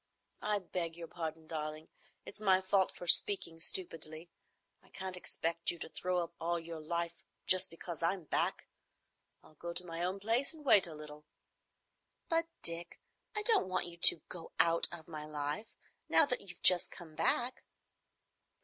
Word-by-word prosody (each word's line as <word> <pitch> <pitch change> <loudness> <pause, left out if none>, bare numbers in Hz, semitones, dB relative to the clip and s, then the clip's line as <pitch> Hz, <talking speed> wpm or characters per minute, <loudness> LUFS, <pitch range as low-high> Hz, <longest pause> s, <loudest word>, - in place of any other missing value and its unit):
"I 210 0 0
beg 175 -3 -5
your 170 -1 -8
pardon, 160 -1 -7
darling. 155 0 -5 0.4
It's 215 - -11
my 190 -3 +3
fault 190 0 +1
for - - -10
speaking 175 -2 +5
stupidly. 165 -2 -3 0.5
I - - -22
can't 190 -1 -4
expect 170 -1 -3
you 170 - -1
to - - -6
throw 180 0 -2
up 170 0 -10
all 170 +1 -1
your 165 -1 -8
life 170 +2 -4 0.2
just 185 0 +4
because 165 -1 -8
I'm 175 +2 -1
back. 150 - -2 0.8
I'll - - -20
go 170 +3 -8
to 180 - -1
my 165 -1 -6
own 185 +3 -2
place 230 +9 0
and 300 -2 -15
wait 205 -8 +6
a 160 - -9
little." 150 0 -11 1.0
"But, 330 0 0 0.2
Dick, 170 +1 -3 0.4
I 425 - -1
don't 435 - +7
want 185 - -1
you 170 -1 -8
to—go—out 165 0 +3
of—my 160 -3 -8
life, 150 +7 -4 0.3
now - - +6
you've 185 -3 -10
just 180 -1 +7
come 170 -4 -12
back." 240 +10 +2
170 Hz, 160 wpm, -33 LUFS, 165-185 Hz, 1.0 s, don't